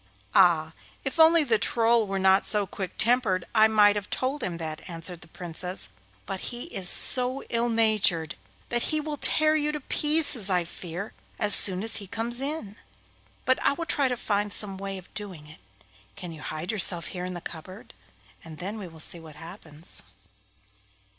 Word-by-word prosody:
'Ah! 165 -4 +3 0.3
if 270 +4 -5
only 320 0 +6
the 230 -6 +1
Troll 230 -1 +1
were 195 0 -3
not 190 0 +3
so 210 -2 +1
quick 190 0 -7
tempered 220 -6 +2
I 220 -1 +5
might 210 -2 +4
have 205 -1 -5
told 265 +3 -3
him 175 -2 -4
that,' 155 -2 -6
answered 165 +1 -5
the 160 - -14
Princess, 180 +2 -4 0.4
'but 195 -1 -5
he 240 0 -6
is 185 -2 -2
so 255 +1 +2
ill 235 +1 0
natured 215 -8 +1 0.4
that 240 0 -1
he 310 - 0
will 300 -1 -5
tear 310 +1 +3
you 300 -1 0
to 300 - -5
pieces, 295 -7 +5
I 180 -2 +2
fear, 175 +3 -8 0.2
as 210 -1 +6
soon 190 0 +7
as 225 0 0
he 200 - -8
comes 230 +4 -1
in. 275 -8 -5 0.7
But 260 -2 +1
I 280 - +2
will 335 +3 -6
try 285 -4 +1
to 250 -1 -3
find 205 -2 -2
some 200 -2 -3
way 195 0 -6
of 185 - -15
doing 190 -8 -8
it. 155 +1 -15 0.6
Can 180 - -8
you 160 -2 -11
hide 155 +6 -5
yourself 180 -6 +2
here 180 -1 -6
in 180 0 -6
the - - -6
cupboard? 185 +5 -11 0.5
and 160 -2 -12
then 200 +6 -6
we 195 - -7
will 165 -1 -15
see 170 +2 +3
what 160 -2 -14
happens. 165 -1 -5
200 Hz, 185 wpm, -25 LUFS, 175-240 Hz, 0.7 s, soon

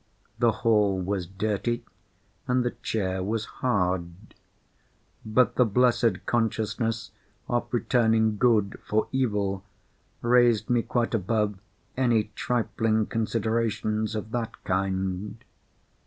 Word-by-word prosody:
The 120 -1 +4
hall 105 -4 +3
was 95 -1 -2
dirty, 105 +4 -2 0.6
and 125 0 +2
the 120 - +1
chair 95 -4 -1
was 110 +2 -1
hard; 95 -4 -2 0.9
but 110 +4 +2
the 125 - +6
blessed 120 -2 +2
consciousness 115 0 -1 0.4
of 120 0 0
returning 110 -3 +2
good 110 -5 +2
for 110 +1 0
evil 105 -7 0 0.6
raised 120 -1 +4
me 120 -1 +3
quite 120 0 -1
above 105 -1 0 0.4
any 115 -5 +2
trifling 110 -2 0
considerations 110 -1 -1
of 110 +1 -5
that 115 -2 -4
kind. 95 +2 -2
110 Hz, 105 wpm, -26 LUFS, 100-120 Hz, 0.9 s, the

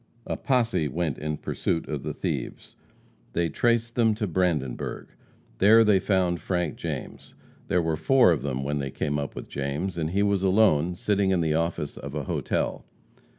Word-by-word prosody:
A - - -2
posse 120 - +1
went 80 0 -2
in 75 0 -3
pursuit 80 - -2
of - - -3
the - - -4
thieves. - - -4 0.6
They 85 -1 +1
traced 115 +2 +1
them 115 -3 +3
to 110 0 -2
Brandenburg. 85 -9 -1 0.5
There 110 +3 +7
they 105 -3 +4
found 90 -3 +1
Frank 90 -4 -1
James. - - -6 0.3
There 90 -1 +2
were 80 -1 0
four 120 +4 +5
of 80 - 0
them 65 -1 -2
when 75 +1 -1
they 70 -1 -3
came 75 +2 -2
up 70 - -5
with - - -7
James, 75 +6 -3
and 80 -1 -1
he 100 +4 +1
was 100 -2 +1
alone, 95 -4 +3
sitting 100 +1 +1
in 95 -2 +2
the 80 -2 +1
office 80 -2 -2
of 70 +2 -7
a 75 - -2
hotel. - - -2
85 Hz, 180 wpm, -26 LUFS, 75-100 Hz, 0.6 s, There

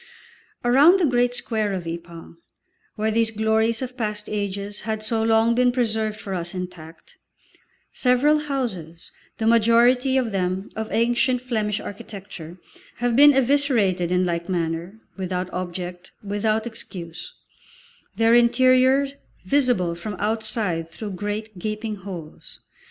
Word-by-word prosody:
Around 285 +10 +6
the 355 - +3
great 245 -2 +2
square 215 -4 -1
of 180 -3 -4
Ypres, 170 0 -8 0.6
where 220 0 0
these 225 0 +2
glories 220 +2 +1
of 255 0 -6
past 210 -4 -3
ages 200 0 -3
had 220 0 -4
so 220 +1 -1
long 225 +1 +3
been 250 +1 +3
preserved 220 -3 -1
for 195 - -6
us 175 0 -3
intact, 175 -3 -9 0.7
several 270 +4 +3
houses, 225 - -5 0.3
the 220 - -2
majority 235 +3 +4
of 245 -4 0
them 185 0 -2
of 220 0 -4
ancient 240 +2 +2
Flemish 215 -4 -2
architecture, 195 -4 -9 0.4
have 240 -1 0
been 290 +3 +8
eviscerated 240 -10 +2
in 180 0 +2
like 170 0 -2
manner, 170 +3 -3 0.2
without 185 -1 -3
object, 180 0 -5
without 215 +2 0
excuse, 195 - -8 0.8
their 225 0 +3
interior 255 +3 +5 0.4
visible 240 -8 +2
from 190 +5 -6
outside 210 -6 -1
through 210 +4 -7
great, 205 +1 -5
gaping 215 +2 -4
holes. 180 -5 -9
215 Hz, 130 wpm, -23 LUFS, 185-240 Hz, 0.8 s, been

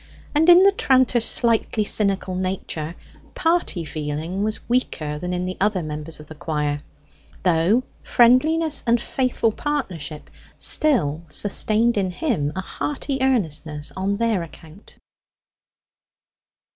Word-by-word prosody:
And 320 +3 +3
in 350 +2 +9
the 395 - +6
tranter's 260 - +3
slightly 230 -2 +2
cynical 195 -2 +1
nature, 180 -3 -3 0.4
party 325 - 0
feeling 155 +5 -4
was 215 0 -2
weaker 155 -12 -1
than 180 +3 -4
in 180 0 -2
the 185 0 -5
other 195 -3 +1
members 155 +1 -5
of 150 - -11
the 155 - -11
choir, 150 -2 -2 0.6
though 180 +7 +3 0.2
friendliness 300 +6 +3
and 235 +1 +4
faithful 250 -2 0
partnership 185 - -4 0.3
still 170 - +2
sustained 215 +7 +1
in 190 -2 +1
him 180 - -1
a 190 - -2
hearty 275 +6 -4
earnestness 160 - -1
on 195 +2 -1
their 225 -4 +1
account. 165 +3 -13
195 Hz, 120 wpm, -22 LUFS, 160-245 Hz, 0.6 s, in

